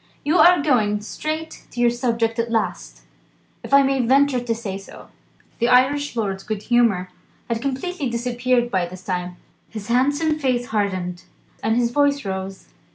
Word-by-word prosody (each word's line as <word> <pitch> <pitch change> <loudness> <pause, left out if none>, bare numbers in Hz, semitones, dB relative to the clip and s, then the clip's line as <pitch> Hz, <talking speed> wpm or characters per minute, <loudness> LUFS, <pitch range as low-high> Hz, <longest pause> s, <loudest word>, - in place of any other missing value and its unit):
You 315 +5 +3
are 355 -4 +6
going 215 -8 +2
straight 310 +8 -5
to 240 - -9
your 240 -1 +4
subject 235 -2 -1
at 230 0 0
last, 135 - -3 0.6
if - - -10
I 275 0 +7
may 270 -1 +1
venture 270 +1 +3
to 235 -1 -2
say 195 -4 -5
so." 195 - -13 0.5
The 235 - +2
Irish 270 +3 +3
lord's 195 -4 -2
good 210 0 -5
humour 230 -7 +2 0.4
had 230 -1 -2
completely 275 +3 -3
disappeared 240 +1 0
by 185 -2 0
this 185 +1 -11
time. 180 -1 -4 0.3
His 215 -1 -8
handsome 285 +6 +2
face 250 -3 0
hardened, 185 -4 -2 0.4
and 220 +1 +1
his 240 -1 +1
voice 285 -1 +1
rose. 190 0 -5
240 Hz, 160 wpm, -22 LUFS, 205-270 Hz, 0.6 s, I